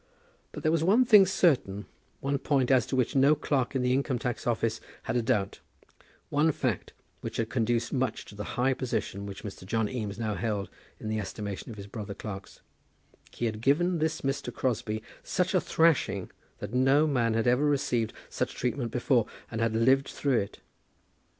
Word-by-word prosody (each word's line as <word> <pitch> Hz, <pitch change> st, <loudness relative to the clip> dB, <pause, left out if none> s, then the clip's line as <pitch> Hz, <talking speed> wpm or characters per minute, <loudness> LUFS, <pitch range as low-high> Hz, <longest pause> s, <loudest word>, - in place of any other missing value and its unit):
But -, -, -8 dB
there 155 Hz, -, +3 dB
was 165 Hz, -1 st, +2 dB
one 215 Hz, +9 st, +5 dB
thing 210 Hz, -5 st, +8 dB
certain, 125 Hz, -, +2 dB, 0.4 s
one 140 Hz, +1 st, 0 dB
point 135 Hz, -3 st, +1 dB
as 130 Hz, -3 st, +4 dB
to -, -, -2 dB
which 130 Hz, +2 st, +1 dB
no 140 Hz, +3 st, +6 dB
clerk 135 Hz, -3 st, -1 dB
in 130 Hz, -, +1 dB
the 125 Hz, 0 st, +2 dB
Income 135 Hz, -1 st, +1 dB
tax 120 Hz, 0 st, -3 dB
Office 115 Hz, -1 st, 0 dB, 0.2 s
had 115 Hz, -, -2 dB
a 120 Hz, -, +3 dB
doubt, 110 Hz, -4 st, 0 dB, 0.7 s
one 150 Hz, +2 st, +3 dB
fact 125 Hz, -, -2 dB, 0.3 s
which -, -, -5 dB
had 115 Hz, -1 st, -1 dB
conduced 115 Hz, -1 st, 0 dB
much 130 Hz, -1 st, -1 dB
to -, -, -12 dB
the 105 Hz, 0 st, -5 dB
high 130 Hz, +2 st, +3 dB
position 120 Hz, -6 st, -3 dB
which 100 Hz, -1 st, -8 dB
Mr. 100 Hz, -3 st, -7 dB
John 110 Hz, +3 st, 0 dB
Eames 105 Hz, -4 st, -4 dB
now 110 Hz, -2 st, -1 dB
held 100 Hz, 0 st, -2 dB, 0.3 s
in -, -, -6 dB
the 110 Hz, 0 st, -1 dB
estimation 100 Hz, 0 st, -5 dB
of 110 Hz, -, -8 dB
his 100 Hz, -, -7 dB
brother 100 Hz, -1 st, -6 dB
clerks, 100 Hz, -2 st, -8 dB, 0.7 s
he 120 Hz, -, -4 dB
had 110 Hz, -1 st, -2 dB
given 170 Hz, +7 st, +2 dB
this 160 Hz, +1 st, 0 dB
Mr. 135 Hz, +1 st, -2 dB
Crosbie 110 Hz, -3 st, -2 dB, 0.2 s
such 180 Hz, +1 st, 0 dB
a 185 Hz, -, +4 dB
thrashing 165 Hz, -2 st, +2 dB, 0.3 s
that 105 Hz, +2 st, -7 dB
no 135 Hz, +4 st, +4 dB
man 120 Hz, -6 st, +1 dB
had 115 Hz, -, +1 dB
ever 125 Hz, +3 st, +3 dB
received 125 Hz, -6 st, +1 dB, 0.2 s
such -, -, -3 dB
treatment 125 Hz, 0 st, -1 dB
before 125 Hz, 0 st, +2 dB, 0.2 s
and 115 Hz, -1 st, -3 dB
had 115 Hz, -1 st, +1 dB
lived 130 Hz, +4 st, +4 dB
through 135 Hz, -4 st, +1 dB
it. 100 Hz, -, -6 dB
125 Hz, 190 wpm, -29 LUFS, 110-140 Hz, 0.7 s, thing